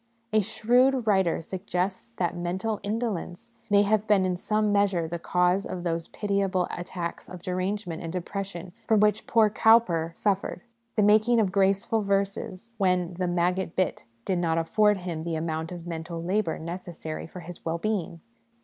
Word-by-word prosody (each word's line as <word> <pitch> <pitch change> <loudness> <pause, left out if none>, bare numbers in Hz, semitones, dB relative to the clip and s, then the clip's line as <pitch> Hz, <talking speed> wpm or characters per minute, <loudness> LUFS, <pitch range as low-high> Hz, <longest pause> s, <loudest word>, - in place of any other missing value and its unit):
A 215 - +5
shrewd 245 +5 +2
writer 190 -5 +3
suggests 180 - -3
that 175 +4 -1
mental 190 +5 -2
indolence 210 -2 -3 0.2
may 205 0 +5
have 215 +1 +1
been 200 -3 +4
in 185 -1 0
some 210 +3 0
measure 200 -5 +2
the 170 +1 -4
cause 180 +3 +2
of 180 -3 -5
those 165 -1 -1
pitiable 195 -3 0
attacks 175 -1 -5
of 180 -1 -9
derangement 185 -1 -2
and 165 - -5
depression 180 0 -5
from 220 -2 +4
which 210 +1 +2
poor 220 -2 +4
Cowper 210 -8 +4
suffered; 200 +1 -1 0.3
the 210 - +3
making 215 +3 +5
of 200 -4 +2
graceful 195 +3 +2
verses 200 +2 -2
when 180 -2 +2
the 180 - +1
'maggot 175 0 0
bit' 185 -2 0 0.2
did 185 -2 0
not 165 -2 +1
afford 210 +5 +3
him 175 -4 -4
the 165 -1 -2
amount 160 0 -3
of 175 -1 -7
mental 165 0 -5
labour 185 -1 0
necessary 170 -2 -6
for 180 +2 -9
his 175 +1 -10
well 165 0 -1
being. 175 -4 -2
185 Hz, 165 wpm, -27 LUFS, 170-210 Hz, 0.3 s, A